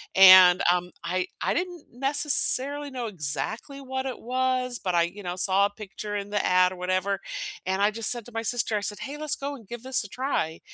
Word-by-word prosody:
and, 185 Hz, -1 st, +9 dB
um, 180 Hz, 0 st, -1 dB
I 180 Hz, +2 st, -1 dB
I -, -, +1 dB
didn't 350 Hz, -3 st, -4 dB
necessarily 285 Hz, +1 st, +1 dB
know 250 Hz, -3 st, -4 dB
exactly 210 Hz, -, -4 dB
what 265 Hz, 0 st, -4 dB
it 255 Hz, -3 st, -5 dB
was, 255 Hz, 0 st, -1 dB
but 180 Hz, -2 st, -2 dB
I, 170 Hz, -, +4 dB
you 190 Hz, +4 st, -6 dB
know, 175 Hz, 0 st, -4 dB
saw 190 Hz, +2 st, +3 dB
a 205 Hz, -, 0 dB
picture 205 Hz, 0 st, -7 dB
in 200 Hz, 0 st, -4 dB
the 205 Hz, -1 st, -1 dB
ad, 180 Hz, 0 st, +4 dB
or -, -, -7 dB
whatever, 185 Hz, +2 st, -1 dB, 0.5 s
and 190 Hz, +1 st, -1 dB
I 205 Hz, +1 st, +4 dB
just 225 Hz, 0 st, -2 dB
said 240 Hz, -3 st, -4 dB
to 245 Hz, -, -13 dB
my 225 Hz, -, -2 dB
sister, 230 Hz, -1 st, 0 dB
I -, -, -3 dB
said, 205 Hz, 0 st, -4 dB
"Hey, 285 Hz, +2 st, -6 dB
let's 305 Hz, -1 st, -1 dB
go, 280 Hz, +1 st, -5 dB
and 230 Hz, -7 st, -15 dB
give 240 Hz, +2 st, -8 dB
this 260 Hz, -3 st, 0 dB
a -, -, -9 dB
try," 230 Hz, -, -2 dB
215 Hz, 225 wpm, -26 LUFS, 185-260 Hz, 0.5 s, and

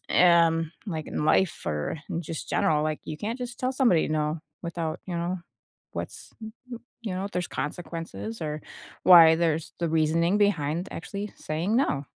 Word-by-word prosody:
eh 175 Hz, -1 st, +6 dB
um, 165 Hz, 0 st, -1 dB
like, 160 Hz, -6 st, -4 dB
in -, -, -2 dB
life 180 Hz, +3 st, +2 dB
or 75 Hz, -, -2 dB
in 170 Hz, -, -2 dB
just 160 Hz, -1 st, -6 dB
general, 150 Hz, -1 st, +2 dB
like, 155 Hz, 0 st, -1 dB
you 155 Hz, -, -5 dB
can't 225 Hz, +7 st, -3 dB
just 245 Hz, -1 st, -6 dB
tell 255 Hz, +1 st, 0 dB
somebody 245 Hz, -, +3 dB
no 155 Hz, +1 st, 0 dB, 0.2 s
without, 170 Hz, -2 st, -3 dB
you 180 Hz, -2 st, -3 dB
know, 175 Hz, +2 st, -2 dB, 0.5 s
what's -, -, -6 dB
y 220 Hz, -, -6 dB
y -, -, -25 dB, 0.5 s
you 200 Hz, -5 st, -3 dB
know, 190 Hz, -, -2 dB
if 200 Hz, -, -6 dB
there's 180 Hz, -1 st, -2 dB
consequences 140 Hz, -, -5 dB
or 150 Hz, -1 st, -3 dB, 0.4 s
why 165 Hz, -3 st, +9 dB
there's 165 Hz, -1 st, 0 dB
the 170 Hz, -, 0 dB
reasoning 165 Hz, +4 st, +2 dB
behind 175 Hz, -4 st, +1 dB
actually 200 Hz, +4 st, -5 dB
saying 165 Hz, +8 st, -1 dB
no. 150 Hz, -, +1 dB
165 Hz, 175 wpm, -27 LUFS, 155-185 Hz, 0.5 s, why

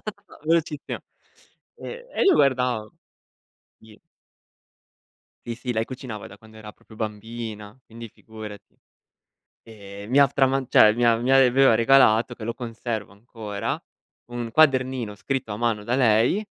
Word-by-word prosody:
ta, 200 Hz, -2 st, -20 dB
velocissima. 160 Hz, -2 st, -1 dB, 0.8 s
E 485 Hz, +1 st, -8 dB
e -, -, -1 dB
io 385 Hz, -3 st, +5 dB
guardavo. 125 Hz, -5 st, +1 dB, 0.9 s
Sì. 110 Hz, -1 st, -18 dB, 1.5 s
Sì, 120 Hz, -, -4 dB
sì, 125 Hz, +1 st, -4 dB
lei 110 Hz, -1 st, -1 dB
cucinava 125 Hz, -5 st, -8 dB
da 95 Hz, -, -13 dB
quando 110 Hz, +1 st, -18 dB
era 105 Hz, -1 st, -11 dB
proprio 110 Hz, -, -19 dB
bambina, 110 Hz, 0 st, -7 dB
quindi, 115 Hz, 0 st, -10 dB
figurati. 110 Hz, -1 st, -12 dB, 0.9 s
Ehm, 100 Hz, -1 st, -11 dB
mi 135 Hz, -, +3 dB
ha 140 Hz, -, +7 dB
f 135 Hz, -, -14 dB
trama 135 Hz, 0 st, +2 dB
cioè, 105 Hz, -, +6 dB
mi 120 Hz, +1 st, 0 dB
a 115 Hz, -1 st, +4 dB
mi 120 Hz, +3 st, -2 dB
aveva 135 Hz, -2 st, +5 dB
regalato, 120 Hz, -1 st, +4 dB
che 110 Hz, -, -9 dB
lo 115 Hz, +1 st, -3 dB
conservo 115 Hz, -4 st, -5 dB
ancora, 105 Hz, -1 st, -6 dB, 0.5 s
un 120 Hz, -1 st, -5 dB
quadernino 130 Hz, -5 st, +2 dB
scritto 130 Hz, 0 st, -4 dB
a -, -, -4 dB
mano 110 Hz, -2 st, -1 dB
da 120 Hz, -, -1 dB
lei 125 Hz, -, +3 dB
115 Hz, 145 wpm, -24 LUFS, 110-130 Hz, 1.5 s, ha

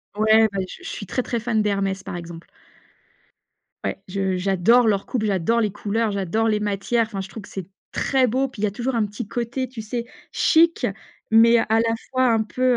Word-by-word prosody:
Ouais 220 Hz, +1 st, +5 dB
bah 195 Hz, -, -2 dB
je -, -, -11 dB
je -, -, -6 dB
suis 205 Hz, -, -6 dB
très, 255 Hz, +7 st, -1 dB
très 235 Hz, -, -2 dB
fan 225 Hz, -1 st, 0 dB
d'Hermès, 195 Hz, -1 st, -1 dB
par -, -, -6 dB
exemple. 170 Hz, -1 st, -8 dB, 1.4 s
Ouais. -, -, -3 dB
Je 190 Hz, -1 st, -1 dB
j'adore 195 Hz, +6 st, +3 dB
leur 200 Hz, -2 st, +1 dB
coupe, 230 Hz, -4 st, -2 dB
j'adore 205 Hz, +3 st, +1 dB
les 210 Hz, -3 st, +1 dB
couleurs, 215 Hz, +2 st, -1 dB
j'adore 200 Hz, +3 st, 0 dB
les 210 Hz, -1 st, +1 dB
matières 210 Hz, +3 st, 0 dB
enfin, 200 Hz, -3 st, -6 dB
je 190 Hz, -, -4 dB
trouve 210 Hz, +1 st, -9 dB
que -, -, -13 dB
c'est 190 Hz, -3 st, -6 dB, 0.2 s
très 265 Hz, -2 st, +2 dB
beau, 260 Hz, +4 st, +1 dB
puis 250 Hz, -6 st, -10 dB
il 215 Hz, -, +3 dB
y -, -, +2 dB
a -, -, -3 dB
toujours 245 Hz, +3 st, -2 dB
un 220 Hz, -2 st, +2 dB
petit 205 Hz, +1 st, -6 dB
côté, 245 Hz, +3 st, -3 dB
tu 235 Hz, -2 st, -8 dB
sais, 235 Hz, +2 st, -4 dB, 0.3 s
chic, 335 Hz, +1 st, +3 dB, 0.4 s
mais 230 Hz, +1 st, +7 dB
à -, -, +2 dB
la 225 Hz, 0 st, +1 dB, 0.2 s
fois 255 Hz, -1 st, +2 dB
un 220 Hz, -1 st, +2 dB
peu, 255 Hz, +4 st, -5 dB
220 Hz, 215 wpm, -23 LUFS, 195-235 Hz, 1.4 s, mais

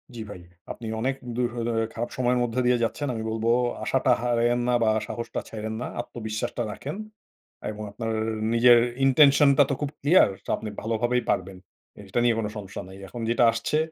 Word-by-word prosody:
জ্বি 115 Hz, -, -6 dB
ভাই। 90 Hz, -3 st, -9 dB, 0.3 s
আপনি 115 Hz, -, -7 dB
অনেক 130 Hz, +3 st, 0 dB, 0.2 s
দূরহ 120 Hz, -1 st, -1 dB
দে 120 Hz, -, 0 dB, 0.2 s
খারাপ 120 Hz, +1 st, -3 dB
সময়ের 125 Hz, 0 st, +2 dB
মধ্যে 120 Hz, +1 st, -1 dB
দিয়ে 125 Hz, -1 st, +3 dB
যাচ্ছেন। 145 Hz, +5 st, -2 dB
আমি 110 Hz, -1 st, -4 dB
বলব 110 Hz, 0 st, -3 dB, 0.4 s
আশাটা 130 Hz, -1 st, +2 dB
হারায়েন 120 Hz, 0 st, +2 dB
না 125 Hz, -, +2 dB
বা 110 Hz, -, +3 dB, 0.2 s
সাহসটা 115 Hz, +1 st, -4 dB
ছাইড়েন 110 Hz, 0 st, -5 dB
না, -, -, -3 dB
আত্মবিশ্বাসটা 120 Hz, +1 st, -4 dB
রাখেন। 135 Hz, -, -6 dB, 0.8 s
এবং 105 Hz, 0 st, -7 dB
আপনার 115 Hz, +2 st, -4 dB, 0.4 s
নিজের 120 Hz, +1 st, +7 dB, 0.3 s
intention 140 Hz, +1 st, +6 dB
টা 145 Hz, -, +8 dB
তো 140 Hz, -, +1 dB
খুব 145 Hz, -, -1 dB
ক্লিয়ার, 155 Hz, -, +5 dB, 0.3 s
আপনি 110 Hz, -, -6 dB
ভালোভাবেই 120 Hz, +3 st, 0 dB
পারবেন। 95 Hz, +1 st, -1 dB, 0.4 s
এইটা 100 Hz, +3 st, -2 dB
নিয়ে 120 Hz, -2 st, +3 dB
কোনো 105 Hz, -2 st, -2 dB
সমস্যা 100 Hz, -1 st, -7 dB
নাই। 95 Hz, +1 st, -11 dB
এখন 120 Hz, +4 st, -7 dB
যেটা 120 Hz, +1 st, +3 dB
আসছে, 115 Hz, +6 st, -1 dB
120 Hz, 175 wpm, -25 LUFS, 110-125 Hz, 0.8 s, টা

